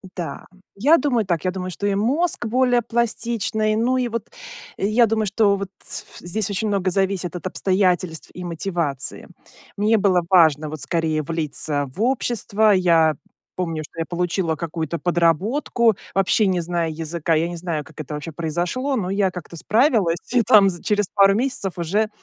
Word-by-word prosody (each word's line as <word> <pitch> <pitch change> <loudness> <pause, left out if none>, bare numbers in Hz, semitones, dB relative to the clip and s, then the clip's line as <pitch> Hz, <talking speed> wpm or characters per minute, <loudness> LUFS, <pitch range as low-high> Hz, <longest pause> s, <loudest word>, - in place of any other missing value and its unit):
Да. 165 -6 -5 0.3
Я 285 +12 +5
думаю 250 -8 +1
так. 175 -1 -1
Я 185 - +1
думаю, 185 0 -5
что, 200 - -5
и 200 -1 +1
мозг 270 - 0
более 245 +1 +2
пластичный. 230 -2 -1
Ну, 245 +4 +1
и, 250 -1 0
вот, 230 -1 -5 0.5
я 215 +5 +3
думаю, 220 -1 0
что, 200 0 +3
вот, 195 -1 -5
с - - -5
ф - - -15
здесь 200 +4 -3
очень 205 +2 -1
много 195 -2 0
зависит 190 -2 -1
от 180 - -7
обстоятельств 185 -3 0
и 180 - -8
мотивации. 170 -5 -3 0.5
Мне 215 +2 +3
было 190 -3 +3
важно, 155 -4 +4
вот, 155 -2 -6
скорее, 160 +1 0
влиться, 150 -2 -2
в - - -5
общество. 220 -4 +1
Я 165 -5 +4 0.4
помню, 165 -4 -3
что 160 - -12
я 165 - -1
получила 175 -1 -1
какую-то 160 0 -4
подработку, 190 - +1 0.2
вообще 195 +2 +3
не 185 -2 +1
зная 170 -1 -1
языка. 165 +1 -2
Я 160 +2 +1
не 175 0 -6
знаю, 165 -3 -3
как 155 +1 -10
это 150 0 -6
вообще 155 +3 -6
произошло, 175 - -2
но, 190 -6 -2
я 195 -1 +2
как-то 175 -2 -9
справилась. 215 - +2 0.2
И, 250 - +5
там, 205 -3 +6
за 175 - -10
через 210 -1 +1
пару 195 -1 +5
месяцев, 230 -6 -1
уже, 200 +6 0
185 Hz, 175 wpm, -22 LUFS, 165-220 Hz, 0.5 s, там